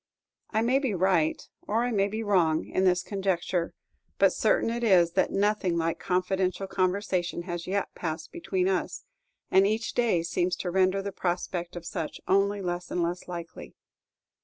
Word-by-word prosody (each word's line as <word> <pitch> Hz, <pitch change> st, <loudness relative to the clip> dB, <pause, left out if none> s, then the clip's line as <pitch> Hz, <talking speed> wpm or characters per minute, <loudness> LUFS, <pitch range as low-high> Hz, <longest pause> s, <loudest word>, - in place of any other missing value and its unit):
I 220 Hz, 0 st, +1 dB
may 255 Hz, +3 st, +3 dB
be 260 Hz, -8 st, -1 dB
right, 175 Hz, -3 st, +1 dB, 0.2 s
or 225 Hz, +3 st, +1 dB
I 245 Hz, -, 0 dB
may 200 Hz, -3 st, +2 dB
be 220 Hz, +2 st, -4 dB
wrong, 175 Hz, -7 st, +2 dB
in 190 Hz, -, 0 dB
this 180 Hz, -1 st, +3 dB
conjecture; 190 Hz, -3 st, -1 dB, 0.4 s
but -, -, +4 dB
certain -, -, +2 dB
it 235 Hz, +1 st, -3 dB
is, 180 Hz, -6 st, +5 dB
that 190 Hz, -, +2 dB
nothing 195 Hz, -3 st, +1 dB
like 165 Hz, 0 st, -1 dB
confidential 185 Hz, 0 st, 0 dB
conversation 185 Hz, -2 st, -1 dB
has 175 Hz, -1 st, -5 dB
yet 200 Hz, +1 st, -1 dB
passed 160 Hz, -2 st, -5 dB
between 185 Hz, +1 st, -1 dB
us, 190 Hz, -2 st, -1 dB, 0.5 s
and 195 Hz, +1 st, +5 dB
each 220 Hz, +2 st, -1 dB
day 225 Hz, -9 st, +2 dB
seems 175 Hz, +2 st, 0 dB
to 180 Hz, -, -4 dB
render 190 Hz, +1 st, +2 dB
the 200 Hz, -, -3 dB
prospect 175 Hz, -1 st, -3 dB
of 175 Hz, -1 st, -7 dB
such 165 Hz, -6 st, -4 dB
only 200 Hz, +1 st, +2 dB
less 175 Hz, 0 st, -3 dB
and 175 Hz, -, 0 dB
less 175 Hz, +1 st, -3 dB
likely. 170 Hz, -2 st, -8 dB
185 Hz, 170 wpm, -27 LUFS, 175-200 Hz, 0.5 s, is